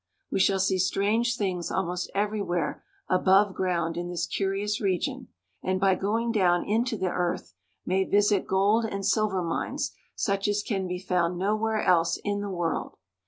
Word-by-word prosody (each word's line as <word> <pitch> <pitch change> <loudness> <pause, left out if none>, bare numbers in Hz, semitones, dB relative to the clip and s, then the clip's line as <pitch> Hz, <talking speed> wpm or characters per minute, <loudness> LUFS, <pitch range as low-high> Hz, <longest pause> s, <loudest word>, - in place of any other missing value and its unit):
We - - 0
shall 195 0 +3
see 190 0 +1
strange 215 +6 +1
things 185 -5 -2
almost 180 0 -2
everywhere 200 -6 -1 0.2
above 190 +2 +4
ground 170 -3 -1
in 175 0 -3
this 175 -1 -2
curious 200 +1 -1
region, 240 +7 -1 0.3
and 185 0 -1
by 195 0 +4
going 225 +5 0
down 180 -5 +2
into 225 +2 0
the 185 -2 -1
earth 175 0 -2 0.3
may 190 +1 +2
visit 205 0 +2
gold 200 +4 +3
and 200 -3 -3
silver 200 -2 +1
mines 165 -1 -2 0.2
such 200 -1 0
as 205 0 0
can 195 -4 -2
be 180 0 -3
found 180 -2 0
nowhere 215 +3 0
else 170 -2 +3
in 205 0 -1
the 205 - -4
world. 175 -3 -2
195 Hz, 165 wpm, -27 LUFS, 180-210 Hz, 0.3 s, above